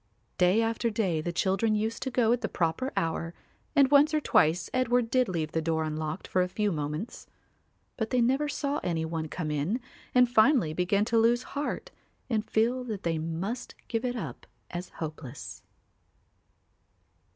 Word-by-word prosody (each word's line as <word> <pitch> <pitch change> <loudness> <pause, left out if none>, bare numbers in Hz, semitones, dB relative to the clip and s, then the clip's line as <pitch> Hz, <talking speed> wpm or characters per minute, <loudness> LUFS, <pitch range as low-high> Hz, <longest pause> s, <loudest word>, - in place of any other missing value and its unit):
Day 185 +5 +4
after 230 +1 0
day 195 -8 0
the 175 - -2
children 195 +5 +1
used 220 +2 -1
to 265 - -2
go 235 -2 +2
at 240 - +2
the - - -2
proper 180 +11 -1
hour 165 +1 -1 0.4
and 275 -2 +5
once 295 +2 +6
or - - +3
twice 165 - +3
Edward 245 -2 +2
did 255 -3 +3
leave 160 -4 -2
the 160 - 0
door 160 0 0
unlocked 155 +2 -4
for 185 - +2
a 180 - +1
few 205 +3 0
moments; 150 +6 -4 0.7
but 220 -2 -2
they 255 - +2
never 265 +5 +2
saw 285 0 -1
any 165 -2 -1
one 160 -1 -3
come 155 -1 -4
in 150 - 0 0.4
and 250 0 +7
finally 235 - +4
began 190 +4 +1
to 230 0 +2
lose 240 +2 +3
heart 295 +12 -3 0.4
and 220 -2 0
feel 240 +4 +2
that 215 -5 -5
they 165 -2 0
must 170 +9 -4
give 230 0 -2
it 250 -1 -1
up 155 - -6 0.2
as 175 +1 -5
hopeless. 150 -5 -7
210 Hz, 175 wpm, -28 LUFS, 165-245 Hz, 0.7 s, and